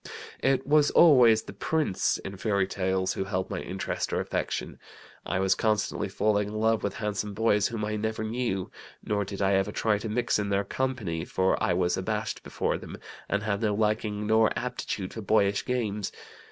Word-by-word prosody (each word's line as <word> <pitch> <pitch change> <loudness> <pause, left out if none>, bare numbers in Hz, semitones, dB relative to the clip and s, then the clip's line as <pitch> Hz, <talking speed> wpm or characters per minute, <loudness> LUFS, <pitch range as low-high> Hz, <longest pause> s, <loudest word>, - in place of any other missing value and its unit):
"It 135 0 +2
was 150 0 +4
always 125 -9 +6
the - - -9
prince, 155 - 0
in 95 - -7
fairy 100 -1 +1
tales, 95 0 -1
who 95 - -3
held 95 -1 -2
my - - -2
interest 95 +1 -3
or - - 0
affection. - - -3 0.5
I - - 0
was 95 0 +3
constantly 110 -2 0
falling 105 -1 +1
in 105 - -6
love 110 +1 +2
with 100 - -2
handsome 105 -1 -3
boys 105 -2 +3
whom 110 -2 -3
I 105 0 -2
never 110 +1 -2
knew; 110 -4 -2 0.3
nor 105 -1 0
did 100 0 -4
I 95 0 +3
ever 95 +1 +1
try 105 -1 +1
to 110 +1 -5
mix 120 0 +1
in 100 -1 -1
their 100 0 +1
company, 105 -10 -2
for 95 +1 0
I 90 - +2
was 90 0 +1
abashed - - -2
before - - -2
them, - - -9 0.3
and 100 +1 0
had 105 -1 -1
no 105 -2 +1
liking 105 0 0
nor 110 +1 +4
aptitude 125 -6 -4
for 110 - -6
boyish 100 -1 +2
games. 105 -5 -2
105 Hz, 190 wpm, -27 LUFS, 100-110 Hz, 0.5 s, always